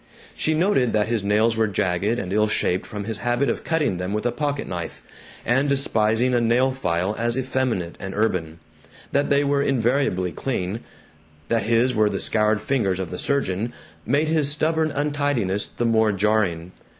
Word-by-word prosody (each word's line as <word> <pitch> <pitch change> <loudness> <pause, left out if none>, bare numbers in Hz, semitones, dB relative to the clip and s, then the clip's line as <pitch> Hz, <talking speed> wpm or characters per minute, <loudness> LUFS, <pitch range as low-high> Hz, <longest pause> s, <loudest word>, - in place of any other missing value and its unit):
She 155 - 0
noted 155 - +2
that 105 0 +1
his 115 -4 0
nails 110 +3 +2
were 110 0 +2
jagged 100 +2 0
and 95 -4 -4
ill 105 +1 +3
shaped 95 -3 0
from 105 -3 -5
his 110 0 -3
habit 120 +3 0
of - - -5
cutting 155 - 0
them 90 +2 -3
with 105 +2 -2
a 120 - +2
pocket 145 0 -2
knife 85 -2 -6 0.4
and 130 +4 +2
despising 120 -3 +2
a 120 - +3
nail 120 +3 +3
file 95 -5 -1
as 120 +1 0
effeminate 130 -9 -1
and 95 0 -6
urban. 90 -7 -1 0.5
That 140 +1 +1
they 140 0 +3
were 140 0 +1
invariably 125 -8 +1
clean, 100 - -3 0.7
that 115 -3 +1
his 120 +2 +3
were 110 -2 +3
the 100 - -3
scoured 105 -1 +1
fingers 100 -9 0
of 95 -2 -4
the 90 - -5
surgeon, 120 -5 -1 0.3
made 145 +7 +1
his 155 -3 +1
stubborn 155 +1 +1
untidiness 145 -9 0
the 120 - -3
more 110 -2 +3
jarring. 95 -4 0
115 Hz, 175 wpm, -23 LUFS, 100-135 Hz, 0.7 s, ill